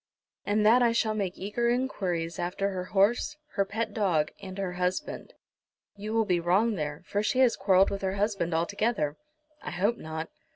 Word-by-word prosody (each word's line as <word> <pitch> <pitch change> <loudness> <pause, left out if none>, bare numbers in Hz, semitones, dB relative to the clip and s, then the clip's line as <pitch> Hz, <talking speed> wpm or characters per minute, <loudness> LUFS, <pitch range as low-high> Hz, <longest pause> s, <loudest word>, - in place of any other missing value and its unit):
"And 210 +1 +2
that 235 +4 +6
I 235 -1 +4
shall 220 -1 +1
make 195 -4 -2
eager 225 +5 -1
enquiries 185 -10 -1
after 195 +3 -1
her 180 -1 -4
horse, 210 +10 +2
her 200 - +1
pet 215 +2 -3
dog, 175 -8 +1
and 190 -1 -8
her 190 -2 -2
husband." 180 +1 -3 0.6
"You 210 +1 -6
will 225 0 +2
be 180 -4 +2
wrong 190 +7 +2
there, 150 -4 -4
for 205 - -1
she 215 +4 0
has 250 -3 +5
quarrelled 190 0 +4
with 200 - -3
her 190 0 -1
husband 200 -4 0
altogether." 170 -1 0 0.5
"I - - -5
hope 205 +7 0
not." 160 +1 -5
195 Hz, 180 wpm, -28 LUFS, 180-220 Hz, 0.6 s, that